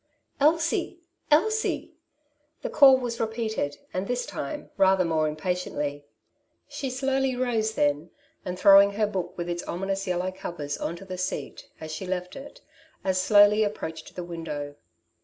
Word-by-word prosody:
^^ -, -, -51 dB, 0.4 s
Elsie! 325 Hz, +3 st, +1 dB, 0.3 s
Elsie! 435 Hz, +9 st, +1 dB, 0.7 s
'^ -, -, -42 dB
The -, -, -3 dB
call 270 Hz, -3 st, +8 dB
was 240 Hz, -2 st, -4 dB
repeated, 220 Hz, -9 st, -2 dB, 0.2 s
and 185 Hz, +2 st, -2 dB
this 245 Hz, 0 st, -1 dB
time 140 Hz, -, -6 dB
rather 190 Hz, -1 st, +4 dB
more 160 Hz, -2 st, +1 dB
impatiently. 150 Hz, -3 st, -3 dB, 0.6 s
She 270 Hz, -, -4 dB
slowly 265 Hz, 0 st, 0 dB
rose 225 Hz, -3 st, 0 dB
then, 145 Hz, +1 st, +1 dB, 0.3 s
and 180 Hz, 0 st, -4 dB
throwing 200 Hz, +1 st, +7 dB
her 215 Hz, +1 st, +1 dB
book 195 Hz, -4 st, -4 dB
with 175 Hz, 0 st, -3 dB
its 175 Hz, 0 st, -2 dB
ominous 195 Hz, +2 st, -3 dB
yellow 180 Hz, +1 st, -1 dB
covers 170 Hz, -6 st, -5 dB
on 170 Hz, -, -3 dB
to 195 Hz, -, -11 dB
the 185 Hz, -1 st, -6 dB
seat, 185 Hz, +1 st, -4 dB
as 155 Hz, 0 st, -7 dB
she 170 Hz, +4 st, -5 dB
left 180 Hz, -1 st, -3 dB
it, 280 Hz, +1 st, -11 dB, 0.4 s
as 185 Hz, -1 st, +1 dB
slowly 205 Hz, +2 st, +6 dB
approached 160 Hz, -6 st, -5 dB
the 180 Hz, -, -4 dB
window. 155 Hz, -4 st, -5 dB
190 Hz, 160 wpm, -26 LUFS, 170-230 Hz, 0.7 s, call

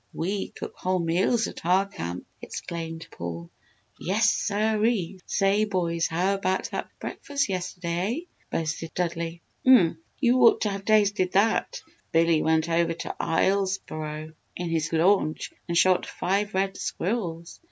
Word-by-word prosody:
We 190 Hz, +4 st, -2 dB
cook -, -, -8 dB
whole 185 Hz, 0 st, 0 dB
meals 180 Hz, +7 st, +2 dB
at -, -, -7 dB
our 185 Hz, +3 st, +3 dB
camp!" 90 Hz, -, -6 dB, 0.2 s
exclaimed 165 Hz, -1 st, -6 dB
Paul. 85 Hz, 0 st, -6 dB, 0.5 s
"Yes 220 Hz, +5 st, +3 dB
siree! 210 Hz, -3 st, 0 dB
Say, 200 Hz, +1 st, +2 dB
boys, 170 Hz, -4 st, 0 dB
how 180 Hz, +4 st, +1 dB
about 190 Hz, -1 st, -1 dB
that -, -, -4 dB
breakfast 280 Hz, -5 st, -2 dB
yesterday, 180 Hz, -, -2 dB
eh?" -, -, -24 dB, 0.2 s
boasted 160 Hz, 0 st, -3 dB
Dudley. 170 Hz, -1 st, -2 dB, 0.2 s
"Umph! 190 Hz, -11 st, +6 dB, 0.2 s
You 250 Hz, -1 st, +4 dB
ought 230 Hz, -, +6 dB
to 210 Hz, -, +1 dB
have 200 Hz, 0 st, -5 dB
tasted 205 Hz, -3 st, +3 dB
that! 210 Hz, +3 st, +2 dB, 0.3 s
Billy 165 Hz, -1 st, +4 dB
went 160 Hz, 0 st, +2 dB
over 170 Hz, 0 st, +2 dB
to -, -, -5 dB
Islesboro 160 Hz, -4 st, -1 dB, 0.2 s
in 175 Hz, -1 st, -3 dB
his 160 Hz, -2 st, 0 dB
launch 165 Hz, -1 st, +2 dB, 0.2 s
and 170 Hz, -1 st, 0 dB
shot 185 Hz, +1 st, +4 dB
five 200 Hz, +2 st, -1 dB
red 190 Hz, 0 st, 0 dB
squirrels. 170 Hz, -4 st, -3 dB
180 Hz, 140 wpm, -26 LUFS, 165-200 Hz, 0.5 s, Umph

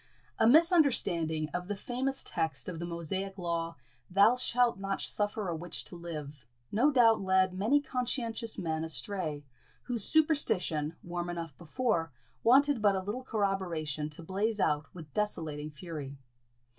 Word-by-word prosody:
A 225 Hz, -, +5 dB
misunderstanding 235 Hz, -, +3 dB
of 180 Hz, 0 st, -3 dB
the 205 Hz, -, -3 dB
famous 260 Hz, +6 st, -3 dB
text 160 Hz, -5 st, -2 dB
of 175 Hz, -3 st, -5 dB
the 170 Hz, -, -4 dB
Mosaic 190 Hz, +4 st, -3 dB
law, 170 Hz, -2 st, -3 dB, 0.3 s
"Thou 200 Hz, +6 st, +5 dB
shalt 245 Hz, -3 st, +1 dB
not 195 Hz, 0 st, -3 dB
suffer 205 Hz, -1 st, -2 dB
a 170 Hz, -, -2 dB
witch 170 Hz, +1 st, -4 dB
to -, -, -7 dB
live," 150 Hz, -5 st, -8 dB, 0.3 s
no 245 Hz, +8 st, +3 dB
doubt 230 Hz, -6 st, +4 dB
led 190 Hz, -1 st, +2 dB
many 220 Hz, +10 st, +2 dB
conscientious 240 Hz, -4 st, -1 dB
men 160 Hz, -3 st, -2 dB
astray, 160 Hz, -3 st, -3 dB, 0.4 s
whose 240 Hz, -4 st, +3 dB
superstition, 180 Hz, -, +4 dB
warm 175 Hz, 0 st, -4 dB
enough 165 Hz, -4 st, -5 dB
before, 170 Hz, -, -1 dB, 0.3 s
wanted 270 Hz, +1 st, +4 dB
but 205 Hz, -2 st, +4 dB
a -, -, 0 dB
little 215 Hz, +7 st, -4 dB
corroboration 175 Hz, -, -2 dB
to 155 Hz, +2 st, -9 dB
blaze 205 Hz, +5 st, -1 dB
out 150 Hz, -3 st, +1 dB
with 155 Hz, -6 st, -12 dB
desolating 155 Hz, -8 st, -2 dB
fury. 145 Hz, -2 st, -8 dB
185 Hz, 145 wpm, -30 LUFS, 160-225 Hz, 0.4 s, A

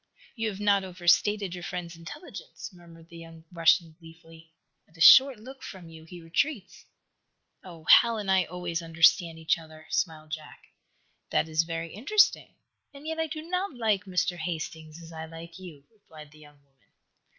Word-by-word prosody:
"You 225 Hz, -2 st, -2 dB
have 195 Hz, -2 st, -8 dB
not 200 Hz, -1 st, +2 dB
overstated 185 Hz, +2 st, +1 dB
your 175 Hz, -1 st, -7 dB
friend's 175 Hz, -2 st, -6 dB
intelligence," 225 Hz, -, -10 dB
murmured 170 Hz, -2 st, -16 dB
the 170 Hz, -, -12 dB
young 165 Hz, -1 st, -13 dB
Russian 165 Hz, -1 st, +3 dB
gleefully. 165 Hz, -1 st, -16 dB, 0.4 s
"At 165 Hz, -, -23 dB
a -, -, -18 dB
short 265 Hz, +8 st, +8 dB
look 260 Hz, +4 st, -12 dB
from 180 Hz, -4 st, -10 dB
you 160 Hz, -1 st, -13 dB
he 175 Hz, +2 st, -11 dB
retreats." 200 Hz, -, -2 dB, 0.8 s
"Oh, 170 Hz, -4 st, -12 dB
Hal 230 Hz, +7 st, +6 dB
and 200 Hz, -3 st, -2 dB
I 190 Hz, -2 st, +3 dB
always 175 Hz, 0 st, -4 dB
understand 165 Hz, 0 st, +3 dB
each 160 Hz, +1 st, 0 dB
other," 155 Hz, -1 st, -14 dB
smiled 155 Hz, -2 st, -2 dB
Jack. 155 Hz, -1 st, -8 dB, 0.7 s
"That -, -, +1 dB
is 160 Hz, +1 st, +1 dB
very 165 Hz, 0 st, -5 dB
interesting. 410 Hz, -, +2 dB, 0.4 s
And 285 Hz, +1 st, -14 dB
yet 320 Hz, 0 st, -4 dB
I 320 Hz, -, 0 dB
do 310 Hz, 0 st, -7 dB
not 360 Hz, -1 st, -3 dB
like 215 Hz, -5 st, 0 dB
Mr. 180 Hz, -1 st, -1 dB
Hastings 160 Hz, -1 st, -6 dB
as 165 Hz, -, -12 dB
I 160 Hz, 0 st, -7 dB
like 165 Hz, +2 st, -11 dB
you," 165 Hz, -7 st, -12 dB
replied 155 Hz, -8 st, -15 dB
the 155 Hz, -, -18 dB
young 145 Hz, -1 st, -17 dB
woman. 135 Hz, -1 st, -38 dB
170 Hz, 175 wpm, -27 LUFS, 160-205 Hz, 0.8 s, short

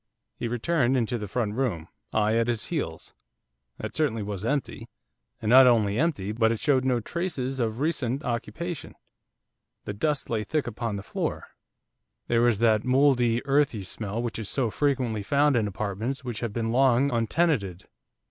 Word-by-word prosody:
He 120 Hz, -, -3 dB
returned 130 Hz, +2 st, +1 dB
into 120 Hz, 0 st, -1 dB
the 105 Hz, -, -5 dB
front 105 Hz, 0 st, -1 dB
room, 110 Hz, -10 st, -2 dB, 0.2 s
I 110 Hz, 0 st, +2 dB
at 115 Hz, 0 st, +2 dB
his 115 Hz, -3 st, -1 dB
heels. -, -, -4 dB, 0.6 s
That -, -, -6 dB
certainly 135 Hz, -9 st, 0 dB
was 100 Hz, -1 st, -5 dB
empty, 125 Hz, -2 st, -2 dB, 0.5 s
and 110 Hz, -, -5 dB
not 130 Hz, +3 st, +8 dB
only 110 Hz, -3 st, +3 dB
empty, 140 Hz, -, 0 dB
but 110 Hz, 0 st, +2 dB
it 115 Hz, -, -2 dB
showed 140 Hz, -4 st, +2 dB
no 130 Hz, -2 st, +2 dB
traces 135 Hz, -, -3 dB
of 115 Hz, -1 st, -1 dB
recent 140 Hz, -3 st, -1 dB
occupation. 140 Hz, +7 st, -4 dB, 0.9 s
The 105 Hz, -, -4 dB
dust 145 Hz, +7 st, -1 dB
lay 110 Hz, -2 st, -1 dB
thick 155 Hz, +5 st, -1 dB
upon 115 Hz, -2 st, -3 dB
the 100 Hz, -, -5 dB
floor, -, -, -4 dB, 0.8 s
there 115 Hz, -1 st, +2 dB
was 120 Hz, -3 st, +3 dB
that 110 Hz, -1 st, +3 dB
mouldy, 125 Hz, -2 st, +3 dB
earthy 140 Hz, -6 st, +2 dB
smell 105 Hz, +4 st, -4 dB
which 120 Hz, -1 st, -3 dB
is 110 Hz, -, -4 dB
so 125 Hz, -5 st, 0 dB
frequently 125 Hz, -7 st, 0 dB
found 140 Hz, +7 st, +2 dB
in 110 Hz, -3 st, +2 dB
apartments 110 Hz, +6 st, -3 dB
which 120 Hz, -4 st, -4 dB
have 115 Hz, -3 st, -3 dB
been 115 Hz, +1 st, -2 dB
long 130 Hz, +2 st, +3 dB
untenanted. 115 Hz, -, 0 dB
120 Hz, 165 wpm, -26 LUFS, 110-135 Hz, 0.9 s, not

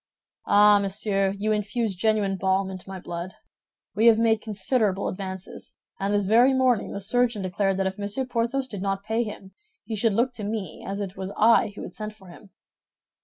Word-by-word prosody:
"Ah, 205 Hz, 0 st, +6 dB
monsieur, 195 Hz, 0 st, 0 dB
you 215 Hz, +2 st, -1 dB
infuse 215 Hz, 0 st, -1 dB
genuine 205 Hz, 0 st, +1 dB
balm 190 Hz, +1 st, 0 dB
into 185 Hz, 0 st, -9 dB
my 190 Hz, -1 st, -6 dB
blood. 175 Hz, +1 st, -6 dB, 0.6 s
We 225 Hz, +3 st, +3 dB
have 225 Hz, -1 st, +7 dB
made 225 Hz, -1 st, +2 dB
considerable 210 Hz, -1 st, 0 dB
advances; 190 Hz, -1 st, -7 dB, 0.2 s
and 195 Hz, +1 st, -1 dB
this 205 Hz, -1 st, +1 dB
very 240 Hz, +6 st, +5 dB
morning 255 Hz, -4 st, +2 dB
the -, -, -4 dB
surgeon 225 Hz, 0 st, 0 dB
declared 190 Hz, +1 st, 0 dB
that 195 Hz, -, 0 dB
if 190 Hz, +1 st, -3 dB
Monsieur 205 Hz, +6 st, -3 dB
Porthos 250 Hz, +2 st, -1 dB
did 205 Hz, -6 st, -7 dB
not 195 Hz, 0 st, -2 dB
pay 220 Hz, +3 st, 0 dB
him, 205 Hz, -3 st, -8 dB, 0.3 s
he 220 Hz, +1 st, -4 dB
should 215 Hz, 0 st, +2 dB
look 245 Hz, +4 st, +1 dB
to 220 Hz, -, -7 dB
me, 205 Hz, -5 st, -4 dB
as 200 Hz, +1 st, -4 dB
it 195 Hz, -2 st, -5 dB
was 190 Hz, 0 st, -5 dB
I 225 Hz, -1 st, +4 dB
who -, -, -7 dB
had -, -, -8 dB
sent 215 Hz, 0 st, -6 dB
for 190 Hz, -4 st, -16 dB
him." 195 Hz, +3 st, -14 dB
205 Hz, 195 wpm, -25 LUFS, 195-225 Hz, 0.6 s, have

